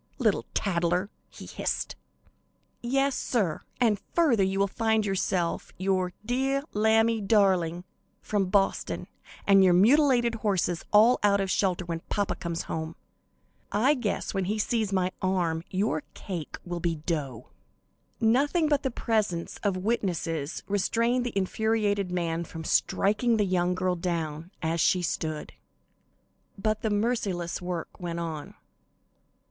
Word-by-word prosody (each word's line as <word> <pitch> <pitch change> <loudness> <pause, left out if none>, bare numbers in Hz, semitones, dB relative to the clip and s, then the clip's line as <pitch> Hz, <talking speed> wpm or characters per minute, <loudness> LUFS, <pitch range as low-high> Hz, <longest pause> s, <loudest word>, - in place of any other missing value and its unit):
"Little - - +1
tattler!" 180 0 0 0.2
he - - -11
hissed. - - -3 0.9
"Yes, 270 +2 +1
sir, 195 -11 -1 0.2
and 220 -5 +2
further 295 -11 +4
you 190 +1 0
will 200 - +3
find 220 +1 +1
yourself, 185 -3 -1
your 185 -1 0
'deah 270 +3 0
lambie 220 +1 +3
darling' 190 -5 +2 0.4
from 200 -3 -1
Boston, 195 0 0 0.4
and 195 -1 +6
your 180 -2 +5
mutilated 240 +3 +4
horses 180 -4 0
all 220 +4 +6
out 200 -1 +4
of 195 -1 -1
shelter 185 -2 +1
when 165 -1 -3
papa 205 -2 0
comes 170 -2 -4
home. 160 0 -4 0.8
I 250 +8 +3
guess 240 -8 -2
when 195 -1 -1
he 210 +4 -1
sees 215 -1 0
my 185 -1 +1
arm 175 -4 0
your 190 -5 0
cake 175 -6 -6
will 175 -1 -4
be 170 -1 0
dough." 150 -6 -4 0.7
Nothing 280 +9 +3
but 290 -2 +2
the 265 - -1
presence 215 -8 -1
of 200 -3 0
witnesses 175 -7 -2
restrained 235 +5 +1
the 225 - -4
infuriated 205 -1 0
man 170 -2 -1
from 160 -1 -8
striking 215 +8 +2
the 210 - +2
young 180 -1 +1
girl 185 -1 0
down, 165 -2 -3
as 165 +1 0
she 180 +1 +3
stood. 155 -2 -3 1.0
But 215 +2 -1
the 220 - 0
merciless 205 -6 -1
work 175 -2 -5
went 170 -2 -4
on. 160 -3 -5
195 Hz, 135 wpm, -27 LUFS, 175-220 Hz, 1.0 s, and